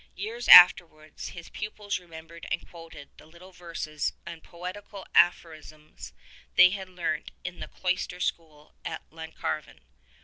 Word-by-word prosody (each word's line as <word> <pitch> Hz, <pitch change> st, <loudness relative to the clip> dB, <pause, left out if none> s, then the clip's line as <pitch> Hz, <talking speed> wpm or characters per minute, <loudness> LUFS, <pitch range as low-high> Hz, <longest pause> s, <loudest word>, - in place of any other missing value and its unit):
Years 225 Hz, +5 st, -6 dB
afterwards 165 Hz, -4 st, +7 dB
his 170 Hz, -1 st, -10 dB
pupils 210 Hz, -1 st, -5 dB
remembered 165 Hz, -1 st, -12 dB
and -, -, -3 dB
quoted 165 Hz, -4 st, -13 dB
the -, -, -17 dB
little 170 Hz, +4 st, -16 dB
verses 165 Hz, -4 st, -5 dB
and 170 Hz, -1 st, -9 dB
poetical 185 Hz, +3 st, -9 dB
aphorisms 155 Hz, -3 st, 0 dB, 0.4 s
they 180 Hz, -, +7 dB
had 190 Hz, -1 st, -6 dB
learnt 170 Hz, -4 st, -4 dB
in 180 Hz, -1 st, -7 dB
the -, -, -7 dB
cloister 180 Hz, -1 st, -3 dB
school 155 Hz, -4 st, -5 dB
at 160 Hz, -, -6 dB
Llancarvan. 160 Hz, -1 st, -6 dB
170 Hz, 130 wpm, -27 LUFS, 160-185 Hz, 0.4 s, afterwards